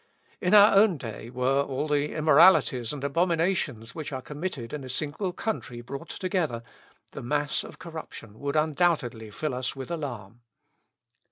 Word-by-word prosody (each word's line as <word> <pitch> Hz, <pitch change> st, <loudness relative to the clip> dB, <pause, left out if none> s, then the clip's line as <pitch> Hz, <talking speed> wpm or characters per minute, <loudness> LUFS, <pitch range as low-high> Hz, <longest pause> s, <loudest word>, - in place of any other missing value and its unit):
In 180 Hz, +3 st, +4 dB
our 205 Hz, 0 st, +8 dB
own 200 Hz, -4 st, +5 dB
day, 115 Hz, -2 st, -7 dB
were 130 Hz, +3 st, +1 dB
all 140 Hz, +1 st, -2 dB
the 150 Hz, 0 st, 0 dB
immoralities 155 Hz, -6 st, +5 dB
and 145 Hz, -2 st, -6 dB
abominations 165 Hz, -, 0 dB
which 155 Hz, -1 st, -6 dB
are 130 Hz, -, -3 dB
committed 145 Hz, -5 st, -5 dB
in 150 Hz, -2 st, -4 dB
a 130 Hz, -, -8 dB
single 155 Hz, +8 st, -2 dB
country 175 Hz, -, -4 dB
brought 135 Hz, +3 st, -8 dB
together, 170 Hz, -, -2 dB, 0.5 s
the -, -, -7 dB
mass 145 Hz, +4 st, -1 dB
of -, -, -11 dB
corruption 155 Hz, -10 st, -9 dB
would 140 Hz, +1 st, -3 dB
undoubtedly 150 Hz, -8 st, +1 dB
fill 130 Hz, +7 st, -3 dB
us 125 Hz, +1 st, -3 dB
with 135 Hz, +4 st, -7 dB
alarm. 120 Hz, -, -6 dB
145 Hz, 155 wpm, -27 LUFS, 125-165 Hz, 0.5 s, our